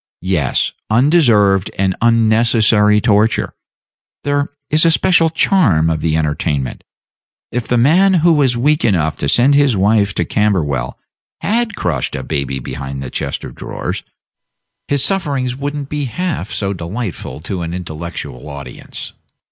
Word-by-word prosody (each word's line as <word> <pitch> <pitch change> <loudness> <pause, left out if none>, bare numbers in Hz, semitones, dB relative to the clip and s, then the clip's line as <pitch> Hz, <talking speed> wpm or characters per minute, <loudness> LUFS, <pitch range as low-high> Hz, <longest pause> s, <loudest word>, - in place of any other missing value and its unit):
Yes, 85 -8 +1 0.2
undeserved 110 - +3
and 95 -1 +1
unnecessary 110 -2 +3
torture 105 +1 +1 0.7
there 145 0 0 0.2
is 155 +1 +3
the 165 - +5
special 165 0 +3
charm 115 - +2
of 80 -2 -2
the 80 -1 +1
entertainment. 75 -3 -2 0.7
If 120 -1 -3
the 125 - +1
man 180 +10 +4
who 170 0 +4
was 135 -5 +2
weak 150 +4 +2
enough 80 -9 +1
to 70 - -1
send 130 - +4
his 140 -6 +3
wife 100 0 +2
to 85 - 0
Camberwell 80 - 0 0.4
had 225 0 0
crushed 80 - -2
a 65 - -4
baby 70 -2 -3
behind 70 +1 -6
a 65 - -7
chest - - -3
of - - -8
drawers, - - -5 0.9
his 140 -2 +1
sufferings 140 -10 -1
would 145 +2 -4
n't 145 -2 -5
be 150 -1 -2
half 165 - -3
so 100 -1 -2
delightful 90 0 -5
to 90 +3 -4
an 85 0 -4
intellectual 85 -5 -7
audience. 70 -1 -8
105 Hz, 145 wpm, -16 LUFS, -, 0.9 s, the